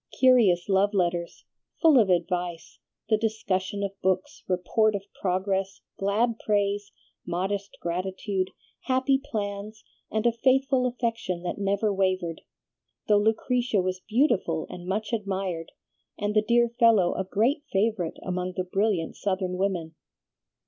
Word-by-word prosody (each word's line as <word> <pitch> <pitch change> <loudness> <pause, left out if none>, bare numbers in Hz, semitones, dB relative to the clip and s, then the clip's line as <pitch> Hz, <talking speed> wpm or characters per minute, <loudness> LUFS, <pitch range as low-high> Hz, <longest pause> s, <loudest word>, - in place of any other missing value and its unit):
Curious 230 -10 +5
love 200 +1 +2
letters, 175 -2 -1 0.3
full 315 -6 +6
of 210 -4 +3
advice, 175 -1 -1 0.3
the 215 - +4
discussion 200 -3 -1
of 200 - -1
books, 185 0 -1
report 205 +4 +2
of 200 - -3 0.2
progress, 190 0 -1 0.2
glad 220 +4 +1
praise, 205 -1 0 0.3
modest 195 +3 -3
gratitude, 185 +2 -2 0.4
happy 265 +1 +2
plans 210 -2 -5 0.3
and 220 +1 -1
a 235 - +5
faithful 260 +2 +2
affection 230 -8 -2
that 180 - -3
never 200 +1 +1
wavered, 185 -3 0 0.7
though 210 -1 +5
Lucretia 225 +2 +1
was 185 0 -1
beautiful 210 - +2
and 175 0 -8
much 210 +4 -2
admired, 190 -6 -2 0.5
and 205 0 -1
the 215 - +6
dear 235 +2 +3
fellow 220 -7 +5
a - - -2
great 230 +10 +1
favorite 195 -4 0
among 180 0 -3
the 185 - +1
brilliant 195 -2 0
Southern 185 -2 -2
women. 180 -4 -1
200 Hz, 130 wpm, -26 LUFS, 185-220 Hz, 0.7 s, full